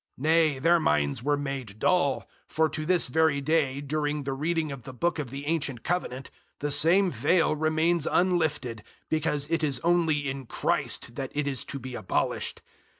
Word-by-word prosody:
003:014 130 - -9
Nay, 160 -2 +3
their 170 +5 +4
minds 75 - +1
were 145 +3 +1
made 135 -7 -5
dull; 160 0 +1 0.2
for 160 0 +2
to 155 0 -4
this 180 -1 +3
very 155 +2 +2
day 140 -2 +1
during 145 0 -2
the 135 0 -2
reading 155 +2 -1
of 135 -2 -7
the 130 +2 -10
book 170 +6 0
of 140 -5 -4
the 140 +3 -7
ancient 145 -6 -1
Covenant, 140 -7 -3 0.3
the 145 0 -2
same 175 +6 +4
veil 155 +6 +2
remains 160 +1 +1
unlifted, 155 -10 +1 0.3
because 150 -2 0
it 165 -1 +1
is 140 -5 +1
only 165 -4 +2
in 135 -2 -5
Christ 120 - -1
that 135 -2 -4
it 150 0 0
is 135 -4 0
to 140 - -5
be 130 -1 -8
abolished. - - -2
150 Hz, 180 wpm, -27 LUFS, 135-160 Hz, 0.3 s, their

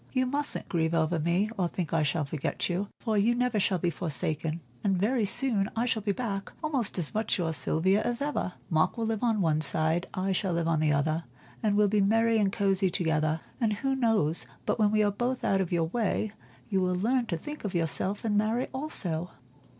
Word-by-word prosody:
You 255 -1 +1
mustn't 285 +3 0
grieve 165 -1 0
over 165 +1 +1
me, 175 +7 +1
or 180 - +2
think 170 -1 -4
I 165 - +3
shall 150 +1 0
forget 140 0 -2
you, 185 +3 -1
for 220 -3 0
you 230 +4 +3
never 250 -3 +1
shall 190 -1 +2
be 175 0 0
forsaken; 155 0 -2 0.2
and 195 -2 +2
very 220 +4 +2
soon 210 -2 0
I 230 +2 +1
shall 230 -3 0
be 205 0 0
back, 200 -3 -3
almost 270 -11 -1
as 170 -5 -2
much 220 +1 0
your 165 -3 -1
Sylvia 165 +8 +2
as 240 +1 -1
ever. 285 -10 -2
Mark 160 +7 +1
will 230 - -1
live 220 -1 -1
on 225 -4 +2
one 155 -3 +2
side, 160 +4 0
I 190 +1 0
shall 190 -1 0
live 170 -1 0
on 165 -2 +2
the 155 -1 +2
other, 155 +3 0 0.4
and 210 -2 +2
we'll 210 0 +4
be 205 +1 +2
merry 225 +3 +3
and 200 -2 +2
cosy 195 -1 +2
together. 160 -2 0 0.2
And 225 -3 +2
who 270 +6 -1
knows 220 - +1 0.2
but - - 0
when 210 -1 +4
we 215 0 +3
are 205 - +2
both 245 +5 -2
out 195 0 +2
of 180 - -3
your 170 -2 +2
way 215 0 0 0.4
you 195 -3 +1
will 180 0 +1
learn 235 +6 +1
to 170 - -1
think 295 - -8
of 200 -3 -3
yourself 175 +6 -1
and 210 -2 +1
marry 220 +4 +1
also." 180 - -3
195 Hz, 220 wpm, -29 LUFS, 165-225 Hz, 0.4 s, we'll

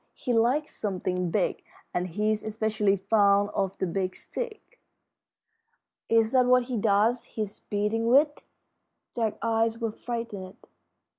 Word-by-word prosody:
He 250 - -2
likes 250 +7 +1
something 180 -3 -2
big, 190 +1 0 0.3
and 180 +1 -1
he's 210 +4 0
especially 215 -2 0
fond 200 0 +3
of 195 -1 -1
the - - -1
Big 185 +1 -2
Stick." 480 +1 -7 1.3
"Is 225 -1 +3
that 255 -1 +4
what 250 0 +5
he 245 -1 -3
does 215 +3 +2
his 210 -2 -5
beating 210 +2 0
with?" 290 +4 +4 0.7
Jack's 225 -3 -1
eyes 225 0 +1
were 230 -2 -2
frightened. 210 -5 -6
220 Hz, 130 wpm, -27 LUFS, 200-235 Hz, 1.3 s, what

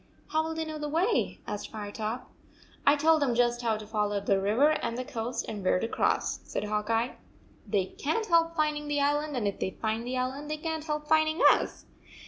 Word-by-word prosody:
"How 315 - +2
will 320 0 -4
they 320 0 -2
know 310 -1 -5
the 300 0 -3
way?" 360 +9 +1
asked 210 -1 -5
Firetop. 220 +3 -4 0.3
" - - -25
I 285 - +8
told 315 +1 +4
them 255 -4 +2
just 240 0 +2
how 225 -2 +1
to 215 - -8
follow 210 -1 0
the 195 -1 +1
river 220 +10 +4
161 310 - 0
and 230 - -4
the 255 - -3
coast, 230 +1 -2
and 210 -3 -5
where 185 - +3
to 225 - -1
cross," - - 0
said - - -4
Hawk 210 0 -2
Eye. 230 +2 0 0.5
"They 200 -4 +1
can 315 - -2
t 435 - -9
help 335 -1 +3
finding 300 -2 0
the 290 0 0
island, 290 0 +1
and 215 -4 0
if 200 - -3
they - - 0
find 220 +1 -1
the 250 +2 -3
island, 265 +4 -3
they 305 - -2
can 320 0 -3
t 310 - -12
help 300 0 -2
finding 315 +1 +3
us. - - -1
255 Hz, 235 wpm, -29 LUFS, 220-305 Hz, 0.5 s, I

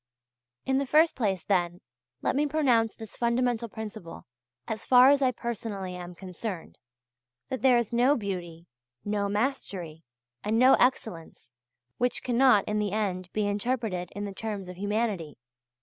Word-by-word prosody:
In 265 0 +2
the 275 - -2
first 315 +4 +4
place, 195 -8 -1
then, 175 -3 0 0.4
let - - +1
me 295 +2 +2
pronounce 255 -7 +2
this 220 -2 -10
fundamental 235 -1 0
principle, 215 -5 -8 0.4
as 220 0 -4
far 255 +1 +7
as 285 0 +3
I 260 - +4
personally 215 -6 -5
am 180 0 -8
concerned 185 0 -7 0.7
that 260 - -3
there 255 -2 +5
is 235 -1 -1
no 250 +5 +4
beauty, 175 - -5 0.4
no 205 -1 -1
mastery, 200 - -3 0.4
and 215 +2 0
no 255 +3 +7
excellence, 200 - -1 0.5
which 245 0 +1
cannot 245 -3 +4
in 210 0 0
the 205 -2 -1
end 185 -4 -2
be 210 -1 0
interpreted 205 -3 -2
in 205 0 -3
the 200 - -6
terms 205 -2 -5
of 180 - -8
humanity. 205 - -2
215 Hz, 150 wpm, -28 LUFS, 190-245 Hz, 0.7 s, far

